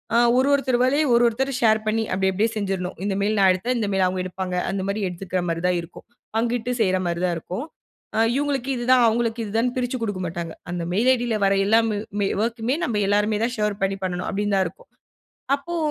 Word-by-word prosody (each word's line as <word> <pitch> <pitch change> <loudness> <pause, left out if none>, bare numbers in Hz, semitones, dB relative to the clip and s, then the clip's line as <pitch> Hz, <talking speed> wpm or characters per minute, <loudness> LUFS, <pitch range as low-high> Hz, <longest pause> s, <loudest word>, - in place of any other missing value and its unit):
அ - - +5 0.2
ஒரு, 265 +2 +3
ஒருத்தர் 260 -3 +2
வேலைய 285 +4 +3
ஒரு, 235 0 +5
ஒருத்தர் 265 +4 -1
ஷேர் 220 -2 +4
பண்ணி 225 +1 +1
அப்பிடி, 190 0 +1
அப்பிடியே 215 +5 +1
செஞ்சிர்ணும். 190 -3 -2
இந்த 200 -1 0
மெயில் 210 +1 +1
நான் 190 -1 +6
எடுத்தேன், 240 +8 -2
இந்த 210 - 0
மெயில் 190 -1 +2
அவுங்க 185 0 -2
எடுப்பாங்க. 185 0 -4
அந்தமாரி 195 +2 -2
எடுத்துக்கிறமாரி 175 -2 -3
தான் 180 -1 +2
இருக்கும். 170 - -13 0.3
பங்கிட்டு 240 +1 0
செய்றமாரி 185 -3 +1
தான் 175 - 0
இருக்கும். 185 - -5 0.5
அ - - +3 0.2
இவுங்களுக்கு 275 -2 -1
இதுதான், 245 0 +4
அவுங்களுக்கு 230 0 0
இதுதான்னு 225 +4 0
பிரிச்சு 250 0 -1
கொடுக்க 205 -4 -3
மாட்டாங்க. 170 -1 -5 0.2
அந்த 175 -1 -3
மெயில் 235 +6 +3
ஐடி 245 0 -3
ல - - +1
வர 195 0 +3
எல்லா 220 +3 +5
ம் 205 -1 -2
ஒர்க்குமே 235 +4 -1
நம்ம 210 -6 -1
எல்லாருமே 210 +1 +2
தான் 250 +1 -3
ஷேர் 210 -1 -1
பண்ணி 195 0 0
பண்ணணும் 180 -1 -2
அப்பிடின்னு 205 0 0
தான் 190 - +2
இருக்கும். - - -15 0.7
அப்போ! 345 +5 -6
210 Hz, 200 wpm, -23 LUFS, 185-240 Hz, 0.7 s, நான்